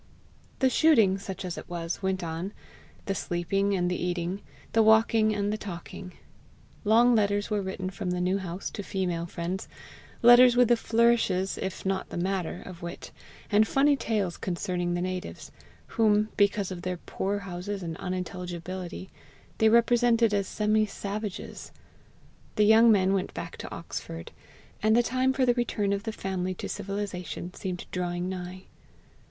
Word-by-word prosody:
The 265 - +3
shooting, 225 -13 +4
such 190 -1 -6
as 180 - -4
it - - -12
was, 170 0 -4
went 190 -1 -1
on, 170 +4 -4 0.5
the 195 - -1
sleeping 195 +3 0
and 180 -1 +1
the 180 0 -2
eating, 180 +2 -2 0.3
the 225 - +5
walking 220 0 +5
and 205 0 0
the 215 - -3
talking. 180 -1 -8 0.7
Long 235 +3 +5
letters 205 -1 +1
were 210 -1 +1
written 190 -1 -4
from 190 -1 -4
the 180 0 -1
New 185 +2 +1
House 180 0 -5
to - - -5
female 180 -3 -2
friends 175 +3 -4 0.6
letters 245 +1 +8
with 245 -2 +5
the 240 - +6
flourishes 225 -5 +2
if 190 0 -4
not 190 0 -1
the - - -6
matter 180 -1 -2
of 175 -2 -10
wit, 170 +1 -7 0.4
and 215 +1 +5
funny 285 +1 +4
tales 210 -9 -1
concerning 175 -1 -2
the 175 - -1
natives, 185 0 -5 0.3
whom, 215 -1 +2
because 200 -1 +2
of 180 -2 -6
their 180 0 -3
poor 195 +3 -3
houses 195 0 -5
and 165 -1 -4
unintelligibility, 180 0 -5 0.5
they 220 - +5
represented 235 -1 +4
as 200 -2 +1
semi 215 0 +2
savages. 205 0 -6 0.8
The 210 - +4
young 225 +2 +7
men 195 -2 +3
went 195 -1 -2
back - - -6
to - - -7
Oxford; 80 0 -7 0.5
and 220 +1 +4
the 240 - +5
time 255 +2 +1
for 265 -1 +1
the 245 - +4
return 215 -4 0
of 200 - -1
the 220 - -1
family 185 -3 -3
to - - -5
civilization 195 -3 -5
seemed 180 -2 -5
drawing 175 0 -2
nigh. 185 0 -6
195 Hz, 160 wpm, -28 LUFS, 180-215 Hz, 0.8 s, letters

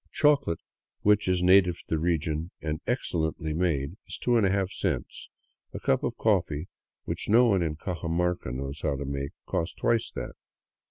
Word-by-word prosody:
Chocolate, 145 - +3 0.5
which 105 -1 +4
is 90 -1 +2
native 90 -1 +6
to - - -14
the 80 - +1
region 80 -1 0
and 80 +1 -3
excellently 80 -10 -1
made, 80 -1 0
is - - -5
2^ 100 -5 +2
cents; 80 -11 -3 0.5
a - - -3
cup 65 - +1
of - - -2
coffee, 75 +4 +1 0.3
which - - -3
no 120 +4 +6
one 100 -6 +3
in 80 -3 -1
Cajamarca 85 -3 -2
knows 70 +3 -5
how 70 - 0
to 70 +1 -4
make, 70 0 -4
costs 85 +1 -2
twice 115 -1 +1
that. - - -5
85 Hz, 160 wpm, -28 LUFS, 75-95 Hz, 0.5 s, native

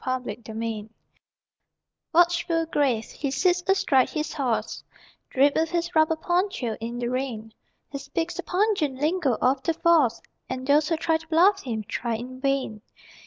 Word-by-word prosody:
MOUNTED 250 -3 -3
POLICE 220 -1 -5 1.2
Watchful, 340 -1 +3
grave, 270 -8 0
he 280 - -3
sits 355 +6 +1
astride 275 -9 +3
his 305 0 -3
horse, 260 -7 -2 0.5
Draped 280 +2 +3
with 320 0 +1
his 345 0 -2
rubber 315 0 +3
poncho, 350 - -1
in 235 +2 -5
the 240 0 -2
rain; 240 -4 -4 0.4
He 280 - -5
speaks 325 +5 -3
the 355 - -4
pungent 360 -6 0
lingo 305 -4 +1
of 265 +2 +2
"The 330 +3 -1
Force," 325 -8 +3 0.3
And 260 0 -4
those 295 +2 +3
who 330 - +1
try 320 0 +1
to 325 0 -16
bluff 370 +5 +4
him, 225 -4 -4
try 235 -2 -2
in 255 +3 -7
vain. 270 -6 -1
285 Hz, 160 wpm, -25 LUFS, 245-335 Hz, 1.2 s, bluff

